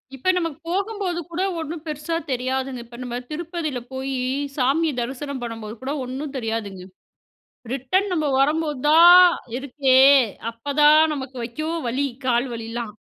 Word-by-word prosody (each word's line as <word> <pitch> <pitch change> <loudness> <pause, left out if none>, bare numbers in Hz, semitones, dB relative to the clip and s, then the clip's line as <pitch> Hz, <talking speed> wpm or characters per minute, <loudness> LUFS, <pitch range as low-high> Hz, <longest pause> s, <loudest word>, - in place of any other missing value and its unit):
இப்ப 270 +8 -1
நமக்கு 330 -5 -3
போகும்போது 390 -1 -2
கூட 350 +3 -2 0.2
ஒண்ணும் 320 0 -6
பெருசா 305 +2 -3 0.2
தெரியாதுங்க. 260 0 -2
இப்ப 235 0 -13
நம்ம 245 -1 -4
திருப்பதியில 315 -4 -4
போய் 265 +1 -3 0.4
சாமிய 290 +4 +2
தரிசனம் 265 +2 -5
பண்ணம்போது 225 -2 -6
கூட 275 +2 -2
ஒண்ணும் 270 +3 -6
தெரியாதுங்க. 220 -5 -4 0.9
ரிட்டர்ன் 370 +10 0
நம்ம 310 -3 0
வரும்போது 300 0 +1
தான் 340 +3 +9 0.4
இருக்கே. 265 -1 +2 0.5
அப்பதான் 295 +6 +4
நமக்கு 265 -2 -6
ஐயோ 310 +7 -5 0.2
வலி, 260 +4 0 0.2
கால் 240 +1 +2
வலில்லாம். 230 -1 -6
275 Hz, 130 wpm, -22 LUFS, 245-315 Hz, 0.9 s, தான்